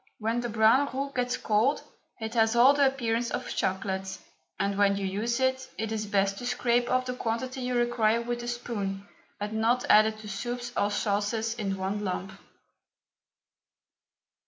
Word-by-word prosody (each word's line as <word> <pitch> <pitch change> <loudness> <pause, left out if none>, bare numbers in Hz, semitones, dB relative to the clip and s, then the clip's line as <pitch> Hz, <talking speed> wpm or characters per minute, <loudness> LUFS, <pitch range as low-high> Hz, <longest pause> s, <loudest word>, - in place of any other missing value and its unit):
When 225 +2 -1
the 240 0 -3
brown 230 +6 +4
roux 275 +2 -3
gets 250 -1 -1
cold 220 +7 +1 0.4
it 220 0 -5
has 225 -1 +3
all 250 +4 +7
the 285 -1 +4
appearance 235 -3 -1
of - - -4
chocolate, 190 0 -2 0.4
and 200 0 0
when 200 0 +3
you 200 - -2
use 220 +6 -1
it 260 0 0
it 220 0 -3
is 215 -1 -2
best 195 -1 +1
to 245 - -6
scrape 245 0 +1
off 255 0 +1
the 250 - -3
quantity 250 +2 -3
you 250 0 -2
require 240 -2 +2
with 240 0 -3
a 240 - -6
spoon, 205 -5 -4 0.3
and 210 +1 -4
not 230 +3 +1
add 215 +1 +7
it 220 0 -4
to 215 - -9
soups 240 +4 -4
or 205 - +1
sauces 210 +2 -1
in 200 -4 -3
one 195 +2 -2
lump. 190 0 -3
225 Hz, 175 wpm, -28 LUFS, 205-245 Hz, 0.4 s, all